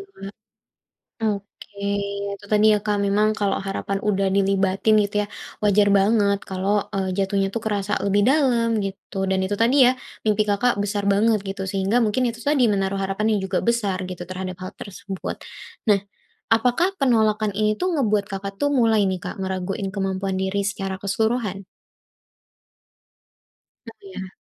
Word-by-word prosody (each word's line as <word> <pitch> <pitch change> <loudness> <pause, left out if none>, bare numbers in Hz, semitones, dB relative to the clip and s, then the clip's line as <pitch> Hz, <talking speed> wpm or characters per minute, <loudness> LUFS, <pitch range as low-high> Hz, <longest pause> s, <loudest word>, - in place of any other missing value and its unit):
Kak. 195 - -12 1.0
Oke, 205 -1 -4 0.6
itu 200 - -14
tadi 210 +1 +5
ya, - - +2
Kak, 210 -1 0
memang 210 +2 +3
kalau 200 -1 +1
harapan 195 0 -2
udah 195 -2 +1
dilibatin 195 +1 +2
gitu 205 0 -4
ya, - - -4 0.4
wajar 205 0 +4
banget 200 -1 +3
kalau, 195 +2 0
eee, 190 -1 -1
jatuhnya 195 0 +1
tuh 225 - -2
kerasa 205 -2 -2
lebih 200 +1 +2
dalam, 255 -5 +3
gitu. 195 +1 -7
Dan 190 - +2
itu 205 - -1
tadi 250 +5 +3
ya, 250 - +5 0.3
mimpi 215 0 +3
Kakak 240 +5 +2
besar 205 0 -2
banget 215 +2 +3
gitu 195 0 -4
sehingga 200 +5 +1
mungkin 220 +4 0
itu 235 0 -4
tadi 285 -4 +3
menaruh 195 0 0
harapan 195 +2 -1
yang - - -3
juga - - 0
besar 205 -6 0
gitu, 180 -1 -6
terhadap 185 0 -5
hal 185 - -6
tersebut. 195 -1 -6 0.5
Nah, 205 -2 +4 0.5
apakah 245 +10 +3
penolakan 220 -5 +2
ini 215 0 +1
tuh 365 - +1
ngebuat 215 -8 +1
Kakak 195 0 -4
tuh 285 0 +2
mulai 225 -5 +3
nih, 185 -1 -1
Kak, - - -6
ngeraguin 190 +1 -3
kemampuan 195 -1 -2
diri 195 +1 -1
secara 195 -2 -3
keseluruhan? 200 -1 -1 2.2
Oh - - -8
iya. 195 - -8
200 Hz, 155 wpm, -23 LUFS, 195-220 Hz, 2.2 s, tadi